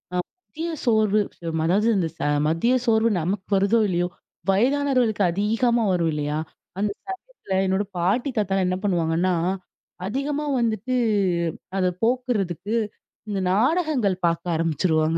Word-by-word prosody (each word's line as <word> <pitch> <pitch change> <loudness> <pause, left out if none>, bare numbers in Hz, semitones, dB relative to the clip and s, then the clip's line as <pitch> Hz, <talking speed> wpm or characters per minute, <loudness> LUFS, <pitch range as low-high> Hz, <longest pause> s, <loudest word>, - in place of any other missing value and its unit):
அ - - +1
மதிய 335 - -6 0.2
சோர்வு 215 -2 +3 0.4
ம - - 0
அதாவது 205 +6 +3
இந்த 170 -3 +1 0.4
மதிய 165 +11 +2
சோர்வு 225 0 +3
நமக்கு 185 +3 -2
வருதோ, 200 +4 +3
இல்லையோ, 175 -1 0 0.4
வயதானவர்களுக்கு 250 -1 +2
அதிகமா 225 +5 +1
வரும், 170 -2 +1
இல்லையா! 150 0 -2 0.4
அந்த 205 0 +1 0.2
சமயத்துல, 385 - -7
என்னோட 190 +2 +1
பாட்டி, 210 +11 +1
தாத்தாலாம் 195 -2 +1
என்ன 185 0 0
பண்ணுவாங்கன்னா? 175 -1 +1 0.7
அதிகமா 285 +6 -2
வந்துட்டு, 230 +2 0 0.8
அத 185 - +2 0.2
போக்குறதுக்கு 220 -6 0 0.6
இந்த 200 - -1
நாடகங்கள் 255 - +2
பார்க்க 170 +1 0
ஆரம்பிச்சுருவாங்க. 160 0 +1
205 Hz, 120 wpm, -24 LUFS, 180-240 Hz, 0.8 s, சோர்வு